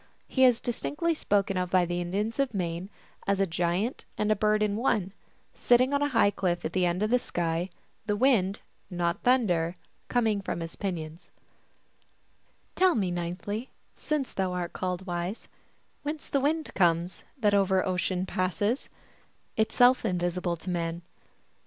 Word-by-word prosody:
He 260 -1 +4
is 245 -2 +5
distinctly 295 +8 -1
spoken 200 -9 0
of 180 -1 -1
by 180 -1 +4
the 175 +1 -2
Indians 205 +7 -2
of 265 -5 +1
Maine 175 0 -2 0.4
as 200 0 +2
a 195 - +4
giant 175 +7 -1
and 210 0 +1
a - - +4
bird 215 +1 +2
in 205 -1 0
one, 215 -5 0 0.4
sitting 245 +1 +4
011 285 0 +2
a - - -4
high 230 -6 +4
cliff 180 -4 -1
at - - -3
the 185 -2 +2
end 175 +4 0
of 215 - 0
the 250 - +4
sky, 170 -3 -2 0.4
the 205 - +1
wind 205 -5 +2 0.3
not 175 -2 -1
thunder 180 -10 +2 0.3
coming 220 -4 +1
from 175 -3 -3
his 165 0 -5
pinions: 165 -3 -5 0.7
" - - -39
Tell 370 -1 +4
me 190 -5 0
ninthly, 180 +7 -4 0.3
jSiuce 300 -4 -2
thou 190 -1 -1
art 175 -1 -3
called 185 0 -3
wise, 175 +3 -4 0.5
Whence 300 0 -5
the 275 - +1
wind 310 +3 0
comes, 170 -1 +1
That 210 -5 +2
over 190 -2 +3
ocean 185 0 -1
passes, 190 - -1 0.7
Itself 245 +3 +4
invisible 175 -1 -1
to 175 +3 -8
man. 170 0 -2
195 Hz, 160 wpm, -28 LUFS, 175-230 Hz, 0.7 s, is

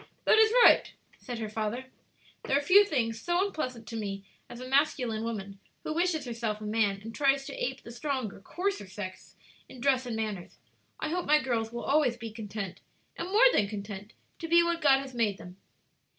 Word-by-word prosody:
"That 440 - +6
is 440 0 +6
right," - - +6 0.3
said 245 -1 -6
her 220 -1 -3
father; 220 +4 -3 0.6
"there 270 - +2
are - - +1
few 390 +6 +7
things 230 - -1
so 350 +5 +1
unpleasant 255 - -4
to 230 - -6
me 200 -3 -4 0.3
as 240 0 -9
a 255 - -7
masculine 255 -5 +1
woman, 200 -4 -5 0.2
who 310 - -3
wishes 335 -3 0
herself 230 -3 -3
a - - -9
man 210 -2 +1
and 225 +1 -7
tries 275 0 +2
to - - -7
ape - - -3
the 235 - -10
stronger, 255 -4 -3
coarser 385 - -3
sex 190 -1 -8 0.3
in 260 - -12
dress 260 0 +2
and 235 - -3
manners. 215 -5 -4 0.4
I 310 - -2
hope 355 +2 -2
my 300 +1 +5
girls 230 -5 -1
will 235 0 -5
always 275 -5 +2
be 230 -2 -7
content, 210 -3 -6 0.3
and 345 - -4
more 430 +6 +5
than 205 - +3
content, 205 0 -7 0.3
to 330 - -5
be 340 +1 +6
what 340 0 -1
God 270 -2 +5
has 270 -1 -9
made 220 -5 0
them." 180 +1 -12
240 Hz, 200 wpm, -29 LUFS, 215-295 Hz, 0.6 s, few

